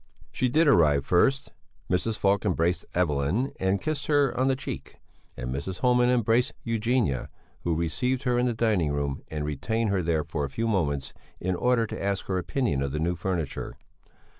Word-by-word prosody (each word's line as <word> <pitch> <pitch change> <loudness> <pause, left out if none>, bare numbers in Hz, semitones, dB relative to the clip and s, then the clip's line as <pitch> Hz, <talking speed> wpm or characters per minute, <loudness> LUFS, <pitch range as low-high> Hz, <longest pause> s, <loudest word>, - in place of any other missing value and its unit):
She 130 - 0
did 160 +6 +3
arrive 75 - +4
first. 135 +10 +2 0.4
Mrs. 105 +4 0
Falk 100 0 +2
embraced 90 -3 0
Evelyn 85 - +1
and 95 +1 +1
kissed 155 -2 -3
her 145 -3 +3
on 130 +1 +2
the 135 - +3
cheek, 130 - -7 0.4
and 60 +1 -4
Mrs. 90 +7 -5
Homan 125 -1 +4
embraced 120 0 +2
Eugenia, 115 - 0 0.3
who 85 -2 -1
received 120 - -1
her 125 -1 +2
in 125 - +2
the 120 - 0
dining 105 -10 +1
room 70 -1 -2
and 75 -1 -4
retained 100 +10 -1
her 95 -2 +1
there 80 -2 0
for 80 -2 -3
a 70 - -2
few 115 +12 -2
moments 70 -10 -1 0.3
in 95 +1 -1
order 125 +4 +2
to 105 - -6
ask 100 -1 -1
her 95 -1 -1
opinion 95 - -1
of 70 -1 -2
the 75 - -1
new 85 +3 0
furniture. 85 -4 -3
95 Hz, 185 wpm, -27 LUFS, 80-125 Hz, 0.4 s, arrive